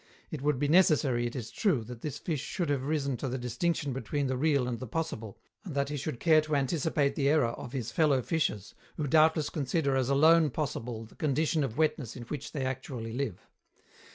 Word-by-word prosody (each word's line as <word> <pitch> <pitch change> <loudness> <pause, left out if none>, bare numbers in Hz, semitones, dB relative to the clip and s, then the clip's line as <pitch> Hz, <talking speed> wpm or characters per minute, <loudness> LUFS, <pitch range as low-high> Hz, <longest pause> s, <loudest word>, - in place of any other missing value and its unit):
It 155 - -5
would 145 -1 +1
be 145 +2 0
necessary, 145 -7 +4
it 120 - -7
is 120 -4 -5
true, 170 - +1
that 120 +1 -9
this 150 -4 -4
fish 155 -6 -3
should 170 0 -3
have 135 -2 0
risen 140 -4 0
to 135 - -3
the 130 - -2
distinction 135 +4 -1
between 140 +2 -2
the 130 -1 0
real 140 -2 +2
and 120 -2 -3
the 130 - -6
possible, 115 -8 -4 0.3
and 170 -8 -7
that 140 0 0
he 145 - -3
should 145 -2 -4
care 155 -2 +5
to 155 -1 -2
anticipate 140 0 +1
the 140 -1 +1
error 145 -6 +3
of 120 +2 -8
his 125 -5 -3
fellow 150 -7 +3
fishes, 110 - -1 0.2
who 155 - -1
doubtless 155 +1 +3
consider 140 -1 0
as 130 -1 +1
alone 155 +3 +5
possible 120 -5 -4
the 110 - -17
condition 155 +1 +1
of 120 -4 -4
wetness 150 -6 0
in 125 - -7
which 135 +4 -6
they 140 -4 -3
actually 130 -3 -4
live. 125 -7 -4
140 Hz, 210 wpm, -30 LUFS, 125-155 Hz, 0.3 s, care